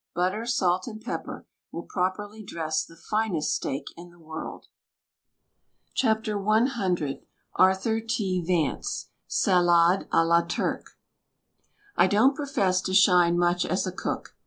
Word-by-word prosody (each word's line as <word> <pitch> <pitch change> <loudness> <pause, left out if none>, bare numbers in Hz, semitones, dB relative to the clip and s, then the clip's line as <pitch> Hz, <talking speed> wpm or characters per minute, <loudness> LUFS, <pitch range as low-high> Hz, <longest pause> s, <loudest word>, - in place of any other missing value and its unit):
Butter, 185 +6 -1
salt, 185 -5 +1
and 215 -2 -7
pepper - - -6 0.3
will 170 - -6
properly 205 +4 -3
dress 155 -5 -2
the 165 - -14
finest 210 -4 -1
steak 135 +2 -3
in 175 +1 -11
the 175 - -20
world. 160 -1 -8 1.4
WRITTEN 220 -3 +1
FOR 215 -1 -2
MEN 215 +4 +3
BY 235 -8 -2
MEN 140 -3 -4 0.3
Arthur 190 +4 +3
T. 195 -5 -1
Vance 175 - -1 0.2
SALADE 175 -1 +3
A 165 - +4
LA 170 +1 +4
TURC 170 - -3 1.0
I - - +5
don't 225 +8 +4
profess 235 -11 0
to 185 - -2
shine 180 -3 +5
much 175 0 +2
as 185 - -1
a 185 - -3
cook. 185 - -5
185 Hz, 140 wpm, -26 LUFS, 170-215 Hz, 1.4 s, I